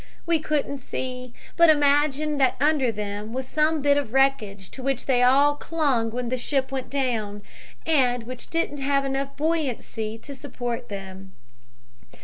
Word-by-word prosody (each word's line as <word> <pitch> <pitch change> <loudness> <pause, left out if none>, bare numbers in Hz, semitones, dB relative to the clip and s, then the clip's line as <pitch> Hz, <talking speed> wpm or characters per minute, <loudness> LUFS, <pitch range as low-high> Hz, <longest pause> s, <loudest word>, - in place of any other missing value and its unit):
We 335 -1 +2
couldn't 295 -2 -1
see, 255 -1 -5 0.2
but 335 -1 +6
imagined 290 0 +3
that 260 -1 +4
under 290 -4 +3
them 210 +1 -5
was 260 0 -3
some 310 0 +1
bit 285 0 +4
of 265 -5 -2
wreckage 220 -8 +1
to 265 - -7
which 270 -1 -1
they 250 -2 +2
all 275 +4 +5
clung 290 -7 0
when 240 +1 -3
the 255 - -1
ship 270 +1 -1
went 265 -1 -4
down, 225 -7 -2 0.4
and 250 -7 +2
which 250 +1 -8
didn't 330 -3 -1
have 275 0 -1
buoyancy 285 -8 -1
enough 225 - -11
to 285 - -7
support 245 -3 -5
them. 190 -1 -8
270 Hz, 155 wpm, -25 LUFS, 240-290 Hz, 0.4 s, but